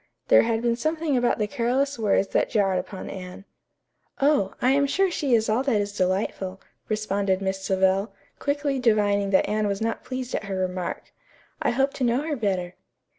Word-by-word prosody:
There - - +8
had 230 0 0
been 235 -1 +2
something 315 +2 -1
about 245 -1 +2
the 215 - 0
careless 260 +3 0
words 200 -2 +2
that - - +1
jarred 195 -4 +2
upon 190 - -7
Anne. 185 +1 -8 0.7
"Oh, 275 -9 +2
I 255 - +3
am 280 +1 +3
sure 385 +6 +1
she 280 -7 +1
is 220 -1 +1
all 220 +4 +2
that 260 -6 +1
is 205 0 -3
delightful," 190 0 -1 0.3
responded 200 -3 0
Miss 190 0 -2
Savell, 190 +2 +1 0.3
quickly 285 -1 -1
divining 205 -4 +2
that 190 - +3
Anne 210 0 0
was 200 -1 -1
not 225 0 -2
pleased 255 -1 -5
at - - -2
her 195 -1 -4
remark. 185 -1 -3 0.5
"I - - +2
hope 270 +3 +1
to 265 - -3
know 245 +3 +2
her 310 -1 -2
better." 190 -7 -1
215 Hz, 185 wpm, -25 LUFS, 195-260 Hz, 0.7 s, There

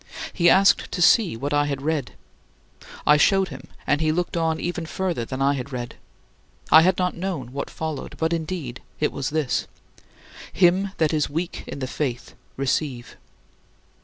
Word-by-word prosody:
He 175 -2 +4
asked 195 +2 +4
to - - -3
see 180 - +4
what 145 +5 -3
I 145 0 +3
had 140 -2 -3
read. 145 -8 -1 0.9
I 150 - +6
showed 190 +4 +3
him, 135 -2 -10 0.2
and 145 +1 +1
he 155 -1 +2
looked 175 +2 -2
on 160 -1 0
even 175 -2 -3
further 175 -9 -2
than 130 +3 -3
I 140 +1 +3
had 140 0 -5
read. 120 -2 -5 0.8
I 160 - +9
had 180 +2 +3
not 180 -1 0
known 170 -9 -4
what 140 - -4
followed. 160 -3 -5
But 160 +1 0
indeed 160 -7 -4 0.2
it 150 - +1
was 135 -1 -3
this, 150 -4 -1 0.8
"Him 190 +2 +3
that 160 -1 +2
is 150 -2 +1
weak 165 +4 -4
in - - -6
the 130 -2 -3
faith, 125 -3 -4 0.2
receive." 135 -2 -2
155 Hz, 170 wpm, -24 LUFS, 135-175 Hz, 0.9 s, I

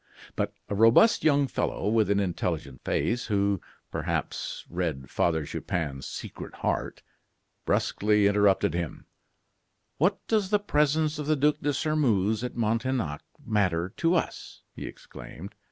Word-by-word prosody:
But - - -2
a - - -3
robust 115 - +5
young 145 -2 +4
fellow, 115 - -2
with 110 -1 +3
an 100 0 +3
intelligent 90 -4 -2
face, 120 0 0
who, 100 -3 +1 0.3
perhaps, - - -3
read 80 -7 -3
Father 80 -3 +1
Chupin's 70 -3 -3
secret - - -7
heart, - - -2 0.6
brusquely 105 0 +2
interrupted 100 -1 +3
him: 85 -2 -4 0.9
"What 185 +6 +1
does 210 -4 +1
the 210 - +4
presence 150 -4 +1
of 150 - -4
the 155 - +3
Duc 150 +1 +2
de 145 - +1
Sairmeuse 120 -8 +1
at 125 - -4
Montaignac 115 - -1 0.2
matter 95 -6 +1
to 170 +1 +2
us?" 165 - -3
he - - -6
exclaimed. 95 +5 -10
110 Hz, 135 wpm, -27 LUFS, 90-145 Hz, 0.9 s, robust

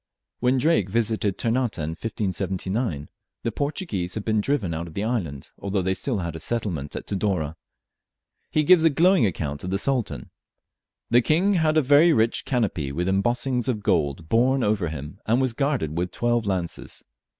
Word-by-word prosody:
When 125 +2 +2
Drake 130 - +2
visited 110 -2 0
Ternate 120 0 0
in 80 -2 -2
1579, 95 - -2 0.4
the 115 - -1
Portuguese 115 - -3
had 110 - -4
been 110 -1 +2
driven 105 - 0
out 85 +2 -4
of 80 - -12
the 100 - -1
island, 90 - -3
although 100 -1 -1
they 95 +1 +1
still 120 +4 -2
had 85 -4 -4
a - - -5
settlement 85 -7 -3
at - - -5
Tidore. 95 -6 -1 0.9
He 155 - +2
gives 170 +1 +6
a 165 - +6
glowing 170 - +4
account 75 -5 -4
of 90 - -4
the 95 - 0
Sultan: 125 +1 -2 0.8
"The 120 +1 +6
King 175 +10 +2
had 160 -3 +2
a 155 - +4
very 145 +5 +6
rich 115 -2 +1
canopy 100 - -1
with 85 +6 -2
embossings 120 +6 0
of 110 -5 -1
gold 75 -2 0
borne 125 +6 +3
over 105 -4 +1
him, 75 +4 -7
and 115 +3 +3
was 130 -3 +1
guarded 135 - -1
with 90 +2 -1
twelve 120 0 0
lances. 90 -4 -3
110 Hz, 175 wpm, -24 LUFS, 90-130 Hz, 0.9 s, gives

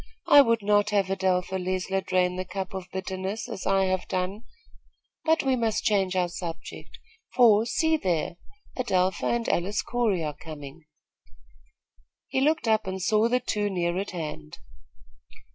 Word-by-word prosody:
I 290 - +9
would 230 -5 +2
not 205 0 +3
have 200 -2 +1
Adelpha 190 -1 0
Leisler 185 +1 -1
drain 180 -1 +1
the 185 - -3
cup 190 0 -5
of 190 -1 -6
bitterness, 190 +3 -4
as - - -5
I 195 0 +3
have 185 -1 -1
done; 190 +5 -3 0.8
but 320 0 +3
we 265 -1 +2
must 225 -3 0
change 195 -3 +1
our 180 -1 +2
subject, 170 -1 -8 0.4
for, 225 -2 +5
see 320 +5 +2
there, 170 - -1 0.4
Adelpha 190 -7 0
and 235 -1 0
Alice 195 +4 0
Corey 225 -8 0
are 150 -1 -3
coming." 155 0 -10 1.4
He 265 +1 0
looked 310 -2 +1
up 220 -2 +2
and 190 0 -3
saw 215 +4 +2
the 250 +1 +2
two 210 -4 -1
near 175 -2 -1
at 200 - -4
hand. 150 - -6
190 Hz, 155 wpm, -26 LUFS, 180-220 Hz, 1.4 s, I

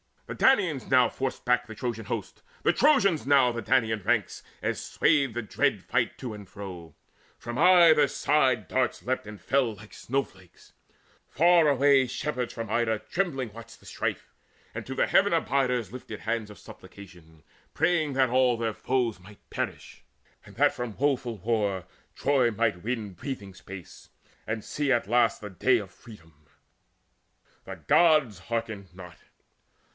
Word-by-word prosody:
The - - -6
Danaans 185 - +2
now 130 -2 +5
forced 135 -1 -4
back 125 0 +1
the 110 - -9
Trojan 115 -1 -4
host, 105 -2 -5 0.2
The - - +4
Trojans 200 - +3
now 135 -3 +5
the 120 0 -4
Danaan 110 -3 +1
ranks, - - 0 0.2
as - - -2
swayed 145 -5 +1
The 120 - -3
dread 105 - -1
fight - - -1
to 125 -4 -5
and 105 -2 -10
fro. 90 -4 -9 0.4
From 120 +1 -6
either 170 -4 +6
side 130 -8 +1
Darts 130 -1 -1
leapt 130 -3 -2
and 105 -1 -9
fell 125 +1 +1
like 105 +1 -15
snowflakes. 100 -9 -5 0.6
Far 170 +1 +4
away 140 -1 +4
Shepherds 125 -1 -3
from 115 -2 -6
Ida 110 -1 0
trembling 140 - -1
watched 115 0 -12
the - - -20
strife, - - -4 0.4
And - - -6
to - - -5
the - - +2
Heaven - - +3
abiders 125 -6 0
lifted 120 -4 -9
hands 110 -1 -2
Of 105 - -12
supplication, 85 -6 -15 0.3
praying 155 -5 +1
that 130 -1 +2
all 125 0 +3
their 115 -1 -2
foes 120 -4 -1
Might 100 +3 -17
perish, - - -5 0.4
and - - -15
that - - +3
from 120 -2 -5
the - - -22
woeful 130 -4 0
war 100 -3 -1 0.3
Troy 135 -3 +2
might 110 -5 -1
win 110 -4 -3
breathing 100 -1 -7
space, 95 -1 -12 0.4
and 110 -1 -3
see 145 -2 -2
at 120 -4 -1
last 120 -1 +2
The 105 - -7
day 125 +7 +2
of 100 -4 -7
freedom: 80 -9 -17 1.2
the - - -7
Gods 155 - +4
hearkened 110 -5 -5
not. 90 -2 -11
120 Hz, 160 wpm, -27 LUFS, 105-135 Hz, 1.2 s, either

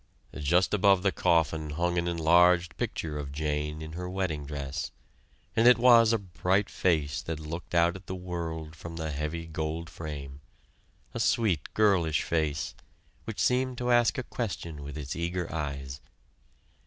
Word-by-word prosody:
Just 85 +7 +2
above 100 -2 +4
the 100 - +3
coffin 80 -3 +1
hung 85 +3 0
an 85 - -1
enlarged 85 0 +4
picture 75 -2 -3
of 70 -1 -5
"Jane" 75 +1 -2
in 80 - -7
her 90 +2 -5
wedding 90 -6 -2
dress, 70 0 -4 0.7
and 115 +2 +5
it 125 - +8
was 115 -2 +6
a 115 - +3
bright 95 0 0
face 75 -5 +1
that 80 -2 -4
looked 85 +3 -6
out 85 +1 +4
at 95 0 -11
the 95 - -4
world 85 -3 -5
from 85 +1 -8
the 80 -1 -3
heavy 75 +3 -3
gold 80 +1 -4
frame, 70 -4 -7 0.7
a - - -4
sweet 95 -11 +1
girlish 90 -9 +3
face, 75 -2 -1 0.5
which - - -6
seemed 125 0 +1
to 125 0 0
ask 120 -1 +4
a 130 - -2
question 85 -11 -5
with 70 +1 -7
its 70 -2 -5
eager 85 0 -3
eyes. 70 -3 -4
85 Hz, 160 wpm, -29 LUFS, 75-90 Hz, 0.7 s, it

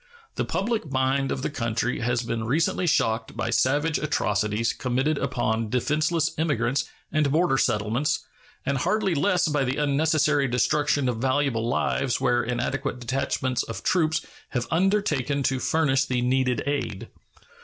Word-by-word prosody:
The - - -2
public 215 - -2
mind 135 +1 +1
of 130 - -3
the - - 0
country 120 -2 -1
has 120 +1 0
been 115 -1 -3
recently 165 +7 +1
shocked 115 -6 0
by 115 0 -1
savage 145 +6 +2
atrocities 105 -5 0
committed 135 +3 0
upon 115 -4 -1
defenseless 155 +6 +1
emigrants 135 -4 +1 0.3
and 150 -3 +1
border 160 -3 +2
settlements, 120 +3 0 0.4
and 140 -1 0
hardly 210 +4 +1
less 180 +3 +2
by 145 -2 +1
the 130 +1 -1
unnecessary 150 0 +2
destruction 145 +3 +1
of 125 -2 -1
valuable 130 -2 0
lives 130 +1 0
where 120 0 +2
inadequate 125 +1 -2
detachments 130 0 -1
of 115 - -6
troops 160 -3 +1 0.2
have 120 -2 -2
undertaken 160 -7 +1
to 135 0 +1
furnish 135 -2 +2
the 125 -2 -1
needed 125 -1 +1
aid. 140 -8 -3
135 Hz, 145 wpm, -25 LUFS, 120-150 Hz, 0.4 s, savage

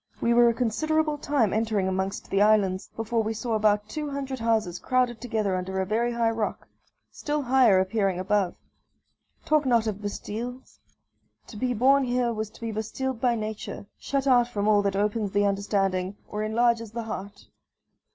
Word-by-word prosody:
We 235 - +2
were 240 0 +6
a - - +1
considerable 300 +6 0
time 280 -9 +1
entering 215 -3 0
amongst 190 +1 -3
the 195 - +2
islands, 205 -3 +3
before 225 +1 -1
we 220 +1 -2
saw 225 +1 -3
about 210 -1 +2
two 300 +4 -4
hundred 270 -2 -4
houses 220 -6 0
crowded 250 -3 0
together 220 -5 -1
under 190 +1 -3
a 190 - 0
very 230 +4 0
high 230 -1 +1
rock 225 -2 -3 0.4
still 295 -1 -2
higher 250 -6 +5
appearing 190 -1 0
above. 195 -1 0 0.9
Talk 305 -1 +3
not 235 -4 +2
of 210 -2 -3
Bastilles! 230 +5 -6 0.7
To - - -12
be 245 +3 -1
born 270 +4 +4
here 245 -1 0
was 215 -1 -4
to - - -18
be 230 -1 -3
bastilled 225 +3 -4
by 245 -2 +2
nature 215 -2 -5
shut 275 -1 -2
out 245 -3 +4
from 210 -4 -2
all 210 -1 +5
that 200 -1 -1
opens 205 0 -1
the 205 0 +3
understanding, 195 -1 0
or 210 - -4
enlarges 230 +1 +1
the 235 0 -3
heart. 200 -2 -7
220 Hz, 175 wpm, -26 LUFS, 205-245 Hz, 0.9 s, were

